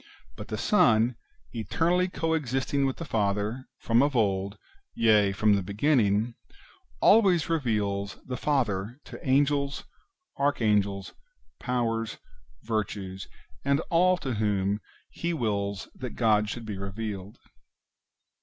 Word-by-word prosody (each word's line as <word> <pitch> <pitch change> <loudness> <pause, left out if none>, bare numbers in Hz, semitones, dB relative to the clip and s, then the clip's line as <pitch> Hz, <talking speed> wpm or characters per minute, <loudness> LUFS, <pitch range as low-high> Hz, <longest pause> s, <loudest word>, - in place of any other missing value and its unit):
But - - -8
the - - -4
Son, 115 +3 +3 0.4
eternally 165 - +1
co 165 -3 -1
existing 135 -2 0
with 135 - -3
the 165 - -5
Father, 105 +2 -1
from 115 +1 +2
of 140 -1 +1
old, 100 -2 0 0.4
yea, 105 -3 +4
from 105 +2 +3
the 100 - +2
beginning, 105 +1 +1 0.7
always 195 -7 +5
reveals 105 -10 -1
the 125 - -4
Father 120 -5 -1
to - - -9
Angels, 140 +1 +1 0.5
Archangels, 105 -8 +1 0.5
Powers, 115 -3 -1 0.5
Virtues, 100 -4 -3 0.4
and 140 +1 +2
all 180 +2 +4
to 135 -6 -3
whom 105 -1 0 0.3
He 170 0 -2
wills 100 -6 -2
that 125 -3 -7
God 105 -3 +2
should 115 +1 -5
be 105 -3 -5
revealed. 100 0 -5
115 Hz, 115 wpm, -27 LUFS, 100-140 Hz, 0.7 s, always